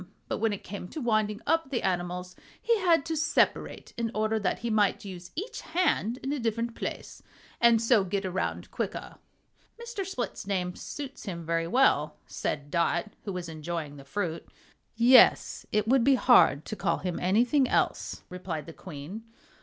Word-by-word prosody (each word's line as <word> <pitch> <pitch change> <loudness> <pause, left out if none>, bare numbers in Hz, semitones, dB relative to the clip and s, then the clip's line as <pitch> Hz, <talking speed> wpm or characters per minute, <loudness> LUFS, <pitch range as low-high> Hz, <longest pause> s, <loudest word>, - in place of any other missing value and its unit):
But - - -2
when 225 0 +2
it 205 - -5
came 195 -1 -7
to 310 - -7
winding 215 -4 0
up 325 -4 +1
the 260 -4 -2
animals 180 0 -2 0.2
he 465 -2 +2
had 335 -6 +3
to 325 -1 -2
separate 310 - 0
in 230 -1 -1
order 215 +1 +1
that 200 - 0
he 235 - 0
might 210 -1 +2
use 180 -2 -8
each 410 +9 -5
hand 290 - 0
in 270 +2 -1
a 295 - -2
different 230 0 -1
place, - - -6 0.4
and 235 -1 +6
so 230 -2 +4
get 195 +1 -2
around 185 0 -3
quicker." - - -4 0.6
"Mr. 470 -4 -4
Split's 255 - -4
name 180 -3 -1
suits 280 -2 -7
him 170 -5 -5
very 165 0 0
well," 170 - +3
said 145 0 -4
Dot, 170 +4 +1
who 200 - -3
was 180 -2 -4
enjoying 155 -2 -5
the 140 - -11
fruit. 165 +2 -3 0.5
"Yes, 245 +3 +5
it 210 0 +1
would 255 0 +4
be 275 +1 +5
hard 240 - +5
to 215 - -5
call - - 0
him 180 -2 -3
anything 240 +9 +3
else," - - 0
replied 180 -4 -5
the 165 - -9
Queen. 170 +5 -8
210 Hz, 175 wpm, -28 LUFS, 180-250 Hz, 0.6 s, and